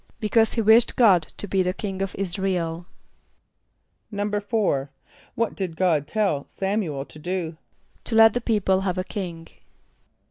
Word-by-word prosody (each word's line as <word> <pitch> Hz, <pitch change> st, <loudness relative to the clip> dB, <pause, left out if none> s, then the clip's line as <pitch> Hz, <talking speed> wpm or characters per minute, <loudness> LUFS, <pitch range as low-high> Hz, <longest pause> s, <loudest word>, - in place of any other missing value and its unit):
=Because 220 Hz, +1 st, +2 dB
he 230 Hz, -, 0 dB
wished 225 Hz, +2 st, +5 dB
God 200 Hz, -8 st, +5 dB, 0.2 s
to 205 Hz, -, -4 dB
be 195 Hz, -1 st, +1 dB
the 180 Hz, 0 st, -1 dB
king 195 Hz, -2 st, -4 dB
of 195 Hz, -, -3 dB
[)I][s+]´ra 190 Hz, 0 st, -1 dB
el.= 165 Hz, +1 st, -4 dB, 1.2 s
=4.= 205 Hz, -, -1 dB, 0.5 s
What 230 Hz, -1 st, 0 dB
did 180 Hz, -5 st, -4 dB
God 160 Hz, -6 st, +2 dB
tell 195 Hz, -8 st, 0 dB
S[)a]m´u 195 Hz, -6 st, -2 dB
el 135 Hz, -, -4 dB
to 155 Hz, -, -13 dB
do? 170 Hz, -1 st, -3 dB, 0.5 s
=To 230 Hz, -, -1 dB
let 225 Hz, -1 st, +7 dB
the 245 Hz, -, -1 dB
people 200 Hz, -5 st, +1 dB
have 185 Hz, -2 st, -2 dB
a 185 Hz, -, 0 dB
king. 175 Hz, -5 st, -6 dB
190 Hz, 155 wpm, -24 LUFS, 170-210 Hz, 1.2 s, let